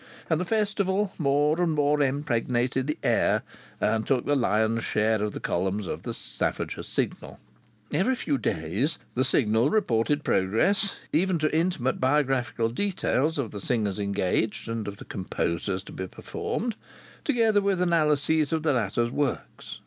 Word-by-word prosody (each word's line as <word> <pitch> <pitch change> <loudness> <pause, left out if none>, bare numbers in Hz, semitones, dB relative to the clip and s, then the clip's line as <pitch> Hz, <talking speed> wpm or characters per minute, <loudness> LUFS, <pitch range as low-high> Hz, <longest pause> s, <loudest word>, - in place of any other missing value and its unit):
And 160 +1 +2
the - - -1
Festival 205 -1 0
more 150 +3 +2
and 170 -2 +2
more 150 0 +2
impregnated 130 -2 0
the 150 - -1
air, - - +2 0.4
and 110 -1 +1
took 130 -3 +1
the 145 - +2
lion's 110 -2 +1
share 110 0 +1
of 105 - -2
the - - -5
columns 95 +3 -1
of - - -4
the - - -4
Staffordshire - - -3
Signal. - - -3 0.5
Every 195 - +2
few 145 - -1
days 95 - -1 0.2
the 130 - +1
Signal 115 -1 +3
reported 145 - +1
progress, 190 - +2 0.2
even 180 +3 +2
to 155 -1 0
intimate 160 -7 0
biographical 130 -4 +1
details 160 - 0
of 135 -6 -2
the 100 - -6
singers 105 -4 -1
engaged, 100 +2 -1
and 115 -2 -3
of 100 0 -5
the - - -11
composers 95 0 -2
to - - -11
be 95 - -5
performed, 230 - -4 0.5
together 225 -7 +3
with 195 -2 +1
analyses 155 -3 +2
of 160 -1 0
the 155 -3 +2
latter's 120 0 0
works. 145 0 -3
140 Hz, 155 wpm, -26 LUFS, 110-165 Hz, 0.5 s, Signal